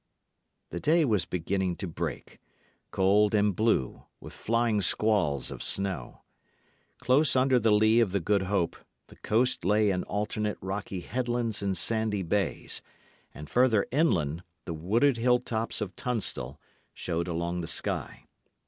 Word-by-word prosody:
The 85 Hz, -, -4 dB
day 160 Hz, -, +3 dB
was 105 Hz, -8 st, +1 dB
beginning 90 Hz, +1 st, -2 dB
to 95 Hz, -, -5 dB
break, 80 Hz, -, -6 dB, 0.5 s
cold 100 Hz, +3 st, +3 dB
and 105 Hz, -2 st, +2 dB
blue, 110 Hz, -, 0 dB
with -, -, -11 dB
flying 115 Hz, -2 st, 0 dB
squalls 95 Hz, -11 st, +1 dB
of -, -, -7 dB
snow. 95 Hz, -10 st, 0 dB, 0.8 s
Close 135 Hz, +3 st, +4 dB
under 130 Hz, 0 st, +3 dB
the 115 Hz, -1 st, +2 dB
lee 110 Hz, +2 st, +4 dB
of 115 Hz, -5 st, +2 dB
the 100 Hz, -, 0 dB
Good 100 Hz, +3 st, +1 dB
Hope, 95 Hz, -5 st, 0 dB, 0.3 s
the -, -, -15 dB
coast 120 Hz, +1 st, 0 dB
lay 105 Hz, +2 st, +3 dB
in 90 Hz, -1 st, -1 dB
alternate 105 Hz, 0 st, -2 dB
rocky 95 Hz, -1 st, -5 dB
headlands 120 Hz, -2 st, -2 dB
and 100 Hz, -2 st, -1 dB
sandy 110 Hz, 0 st, +1 dB
bays; 100 Hz, +4 st, -2 dB, 0.5 s
and 75 Hz, +1 st, -10 dB
further 120 Hz, -, +3 dB
inland 85 Hz, -, +1 dB, 0.2 s
the 85 Hz, -, -4 dB
wooded 115 Hz, -, +1 dB
hill 125 Hz, +1 st, +3 dB
tops 115 Hz, -2 st, -3 dB
of 100 Hz, -3 st, -4 dB
Tunstall 110 Hz, -, -3 dB, 0.4 s
showed 85 Hz, 0 st, -3 dB
along 85 Hz, +1 st, -2 dB
the 80 Hz, -, -6 dB
sky. 85 Hz, -, -3 dB
105 Hz, 145 wpm, -28 LUFS, 90-115 Hz, 0.8 s, Close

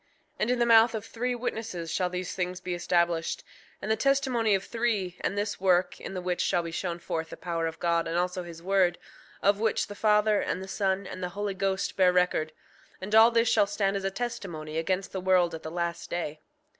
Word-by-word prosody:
5:4 -, -, -39 dB, 0.3 s
And 215 Hz, -, +1 dB
in 250 Hz, -, +2 dB
the 240 Hz, -, +3 dB
mouth 230 Hz, 0 st, +6 dB
of 220 Hz, 0 st, -4 dB
three 245 Hz, +2 st, -2 dB
witnesses 220 Hz, -8 st, -4 dB
shall 180 Hz, -2 st, +1 dB
these 180 Hz, -1 st, -4 dB
things 180 Hz, 0 st, -3 dB
be 180 Hz, -, -4 dB
established; 170 Hz, -1 st, 0 dB, 0.4 s
and 215 Hz, -, -1 dB
the -, -, +4 dB
testimony 255 Hz, -4 st, +2 dB
of 190 Hz, -, -2 dB
three, 220 Hz, -6 st, -1 dB
and 200 Hz, -, -2 dB
this 205 Hz, -1 st, -2 dB
work, 185 Hz, -1 st, +2 dB
in 195 Hz, -, -6 dB
the 180 Hz, -, -4 dB
which 180 Hz, -1 st, -1 dB
shall 175 Hz, -, +1 dB
be 165 Hz, -, -5 dB
shown 170 Hz, +1 st, -3 dB
forth 160 Hz, -1 st, -4 dB
the -, -, -9 dB
power 165 Hz, -1 st, -2 dB
of 160 Hz, -, -6 dB
God 170 Hz, -1 st, +1 dB
and 165 Hz, +1 st, -1 dB
also 180 Hz, +1 st, -1 dB
his 170 Hz, -1 st, -10 dB
word, 190 Hz, -2 st, +2 dB, 0.5 s
of 200 Hz, 0 st, +3 dB
which 220 Hz, -1 st, +1 dB
the -, -, -8 dB
Father, 210 Hz, 0 st, +3 dB
and -, -, -2 dB
the 190 Hz, -, -7 dB
Son, 195 Hz, 0 st, -1 dB
and 185 Hz, -, -7 dB
the 180 Hz, -, -2 dB
Holy 205 Hz, -1 st, -1 dB
Ghost 190 Hz, 0 st, -1 dB
bear 185 Hz, -1 st, +5 dB
record—and 180 Hz, +2 st, -2 dB
all 220 Hz, +1 st, +8 dB
this 230 Hz, 0 st, +2 dB
shall 200 Hz, -, +4 dB
stand 200 Hz, -1 st, 0 dB
as 195 Hz, -, -2 dB
a 195 Hz, -, +1 dB
testimony 175 Hz, -8 st, -4 dB
against 185 Hz, +3 st, -1 dB
the 190 Hz, -, -4 dB
world 180 Hz, -2 st, +3 dB
at 160 Hz, -, -6 dB
the 160 Hz, -, -6 dB
last 170 Hz, 0 st, -3 dB
day. 155 Hz, -3 st, -3 dB
190 Hz, 225 wpm, -28 LUFS, 175-210 Hz, 0.5 s, all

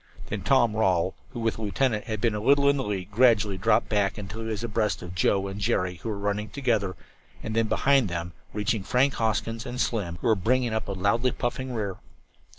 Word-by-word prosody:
Then -, -, -3 dB
Tom 120 Hz, -5 st, +3 dB
Rawle, 95 Hz, -6 st, +2 dB, 0.2 s
who, -, -, -7 dB
with 115 Hz, -1 st, 0 dB
the -, -, -7 dB
lieutenant, 110 Hz, +1 st, 0 dB
had 110 Hz, -1 st, -3 dB
been 115 Hz, 0 st, +1 dB
a 105 Hz, -, -2 dB
little 140 Hz, +5 st, +4 dB
in 140 Hz, 0 st, +4 dB
the 135 Hz, -, -1 dB
lead, 100 Hz, -3 st, -4 dB
gradually 105 Hz, -4 st, +3 dB
dropped 105 Hz, +2 st, +3 dB
back 100 Hz, -2 st, 0 dB
until 105 Hz, +2 st, -6 dB
he 110 Hz, -, -5 dB
was 110 Hz, 0 st, -3 dB
abreast 105 Hz, -6 st, -1 dB
of 90 Hz, 0 st, -7 dB
Joe 95 Hz, +2 st, +1 dB
and 100 Hz, +1 st, -6 dB
Jerry, 90 Hz, -2 st, 0 dB
who 115 Hz, -, -6 dB
were 105 Hz, -, -3 dB
running 105 Hz, +1 st, -2 dB
together, 110 Hz, -8 st, 0 dB, 0.5 s
and 110 Hz, -, -4 dB
then 115 Hz, -1 st, +2 dB
behind 135 Hz, -2 st, +3 dB
them, 85 Hz, 0 st, -4 dB, 0.2 s
reaching 105 Hz, 0 st, -1 dB
Frank 125 Hz, +7 st, +2 dB
Hoskins 115 Hz, 0 st, -1 dB
and 125 Hz, -1 st, -6 dB
Slim, 100 Hz, -10 st, -1 dB
who -, -, -8 dB
were -, -, +6 dB
bringing 120 Hz, +4 st, +1 dB
up 110 Hz, -, -2 dB
a 100 Hz, -, -2 dB
loudly 100 Hz, +6 st, +1 dB
puffing 125 Hz, +1 st, -3 dB
rear. 100 Hz, -4 st, -3 dB
110 Hz, 220 wpm, -26 LUFS, 100-120 Hz, 0.5 s, were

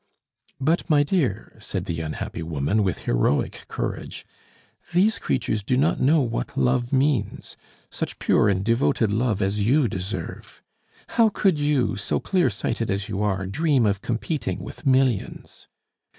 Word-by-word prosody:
"But, 160 Hz, +6 st, 0 dB
my 145 Hz, -2 st, +5 dB
dear," 140 Hz, -, -1 dB
said 95 Hz, -3 st, -4 dB
the 85 Hz, -4 st, -3 dB
unhappy 80 Hz, +1 st, -5 dB
woman, 80 Hz, +5 st, 0 dB
with 95 Hz, -3 st, -1 dB
heroic -, -, 0 dB
courage, -, -, -5 dB, 0.7 s
"these 190 Hz, +2 st, +3 dB
creatures 110 Hz, -, -1 dB
do 125 Hz, +5 st, 0 dB
not 150 Hz, +6 st, +2 dB
know 150 Hz, +4 st, +4 dB
what 115 Hz, -, -3 dB
love 120 Hz, -, +1 dB
means 135 Hz, -5 st, 0 dB, 0.4 s
such -, -, -4 dB
pure -, -, +3 dB
and 95 Hz, -1 st, 0 dB
devoted 115 Hz, -2 st, +2 dB
love 110 Hz, -2 st, +1 dB
as 100 Hz, +2 st, 0 dB
you 130 Hz, +6 st, +3 dB
deserve. 95 Hz, -3 st, -6 dB, 0.5 s
How 230 Hz, -2 st, +4 dB
could 195 Hz, -6 st, +1 dB
you, 145 Hz, -7 st, +1 dB
so 100 Hz, -, -1 dB
clear 180 Hz, -8 st, +1 dB
sighted 115 Hz, +2 st, -3 dB
as 100 Hz, +2 st, -2 dB
you 100 Hz, -1 st, -2 dB
are, 100 Hz, -2 st, 0 dB
dream 135 Hz, -, +1 dB
of 100 Hz, -1 st, 0 dB
competing 125 Hz, +6 st, -2 dB
with -, -, -8 dB
millions?" 130 Hz, -5 st, 0 dB
115 Hz, 150 wpm, -24 LUFS, 95-145 Hz, 0.7 s, my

